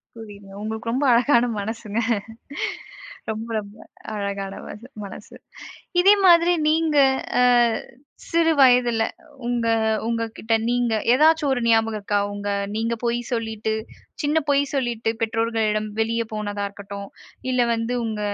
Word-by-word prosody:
புரியுதுங்க. 205 -3 -11
உங்களுக்கு 220 +1 -4
ரொம்ப 265 +4 0
அழகான 245 0 +4
மனசுங்க 220 +1 -4 1.3
ரொம்ப 220 +1 -5
ரொம்ப 205 0 -8 0.4
அழகான 200 -1 -4
மன 205 - -8 0.3
மனசு. 200 +1 -10 0.7
இதே 390 +3 +7
மாதிரி 345 0 +6 0.2
நீங்க 315 -1 +2 1.3
சிறுவயதில 255 -8 +4 0.4
உங்க, 240 -1 0 0.4
உங்ககிட்ட 230 -1 -2 0.2
நீங்க 245 -2 +1 0.2
ஏதாச்சும் 310 +1 +4
ஒரு 245 - -2
ஞாபகம் 225 -1 +2
இருக்கா? 205 0 0
உங்க 205 0 -5 0.3
நீங்க 230 +1 0
பொய் 235 0 0
சொல்லிட்டு, 220 -2 -2 0.5
சின்ன 300 +2 +2
பொய் 280 0 +4
சொல்லிட்டு 235 -4 -1
பெற்றோர்களிடம் 225 -1 0
வெளிய 230 +1 0
போனதா 205 -1 -3
இருக்கட்டும், 200 0 -8 0.4
இல்ல 245 -1 +2
வந்து 230 +2 -2
உங்க 220 -2 -3
230 Hz, 115 wpm, -23 LUFS, 215-245 Hz, 1.3 s, இதே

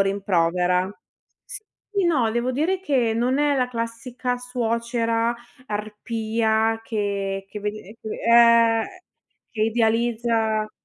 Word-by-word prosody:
rimprovera. 180 -2 +1 1.0
Sì, 400 -2 +2
no, 260 -10 +2
devo 240 +3 -1
dire 330 +8 0
che 260 -10 +1
non 245 +3 +1
è 290 -1 +3
la 250 -1 +1
classica 245 +1 -4
suocera 235 -1 -1 0.3
arpia 220 +1 -1
che 200 -3 -2
che 210 - -7
vedi 210 +1 -4
nei 210 +4 -14
fi 220 - -7 0.2
ehm, 230 -1 +6 0.7
che 220 - -6
idealizza 225 -1 +1
230 Hz, 110 wpm, -23 LUFS, 215-240 Hz, 1.0 s, ehm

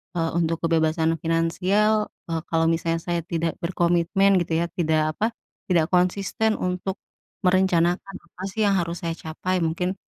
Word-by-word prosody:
eee, 165 -1 0
untuk 165 -1 0
kebebasan 165 0 +2
finansial, 185 +6 +1 0.2
eee, 165 -1 -1
kalau 165 0 +2
misalnya 165 0 0
saya 170 0 -2
tidak 165 -1 -2
berkomitmen 175 +3 +2
gitu 165 0 -1
ya - - +1
tidak 155 -3 0
apa, 225 +2 0 0.3
tidak 170 -4 +3
konsisten 195 +4 +2
untuk, 180 +1 -2 0.5
merencanakan 180 0 +2
apa 175 +1 -16
sih 215 +1 +1
yang 200 - +3
harus 170 0 -3
saya 165 -1 -2
capai 180 +3 -3
mungkin, 180 +3 -1
170 Hz, 150 wpm, -24 LUFS, 165-185 Hz, 0.5 s, tidak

